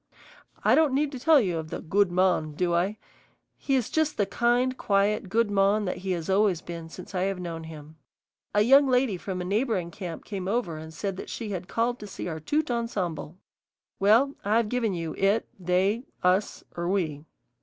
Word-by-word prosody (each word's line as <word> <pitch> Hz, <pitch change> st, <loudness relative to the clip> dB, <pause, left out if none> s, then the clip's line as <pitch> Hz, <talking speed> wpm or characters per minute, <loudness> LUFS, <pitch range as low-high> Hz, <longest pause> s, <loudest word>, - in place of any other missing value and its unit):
I -, -, +5 dB
don't 305 Hz, -4 st, +4 dB
need 290 Hz, +1 st, +1 dB
to 260 Hz, -, -6 dB
tell 315 Hz, +3 st, +6 dB
you 180 Hz, -8 st, 0 dB
of 160 Hz, 0 st, -7 dB
the -, -, -4 dB
"good 195 Hz, +3 st, +1 dB
mon," 175 Hz, -4 st, +2 dB
do 175 Hz, +3 st, 0 dB
I? 185 Hz, +5 st, +1 dB, 0.6 s
He 275 Hz, -, -1 dB
is 250 Hz, -4 st, 0 dB
just 315 Hz, -1 st, +1 dB
the 205 Hz, -, +2 dB
kind, 240 Hz, +5 st, +1 dB
quiet 200 Hz, -2 st, +1 dB
good 225 Hz, +1 st, +1 dB
mon 200 Hz, +1 st, +3 dB
that 180 Hz, -, -2 dB
he 190 Hz, -, -6 dB
has 170 Hz, -2 st, -4 dB
always 195 Hz, -2 st, +3 dB
been 170 Hz, -1 st, -8 dB
since 180 Hz, +3 st, -10 dB
I 180 Hz, -, -1 dB
have 195 Hz, -1 st, -1 dB
known 165 Hz, -2 st, -5 dB
him. 155 Hz, -1 st, -11 dB, 0.6 s
A 210 Hz, -, +5 dB
young 275 Hz, +4 st, +6 dB
lady 250 Hz, -4 st, +2 dB
from 185 Hz, 0 st, -5 dB
a -, -, -4 dB
neighboring 200 Hz, -3 st, 0 dB
camp 175 Hz, -4 st, -7 dB
came 190 Hz, -3 st, -5 dB
over 200 Hz, -6 st, -1 dB
and 160 Hz, 0 st, -9 dB
said 190 Hz, +4 st, -5 dB
she 225 Hz, -3 st, -5 dB
had 185 Hz, -2 st, -4 dB
called 240 Hz, +3 st, 0 dB
to 210 Hz, -, -8 dB
see 195 Hz, -, -6 dB
our 160 Hz, -2 st, -4 dB
tout 295 Hz, -, -1 dB
ensemble. 185 Hz, -8 st, -3 dB, 0.6 s
Well, 225 Hz, +8 st, +4 dB
I've 215 Hz, +2 st, +2 dB
given 230 Hz, -5 st, 0 dB
you 165 Hz, -2 st, -4 dB
it, 200 Hz, +3 st, +2 dB
they, 190 Hz, +7 st, +1 dB, 0.2 s
us, 185 Hz, +3 st, +1 dB
or 170 Hz, 0 st, -2 dB
we. 160 Hz, -7 st, -1 dB
195 Hz, 195 wpm, -27 LUFS, 175-230 Hz, 0.6 s, tell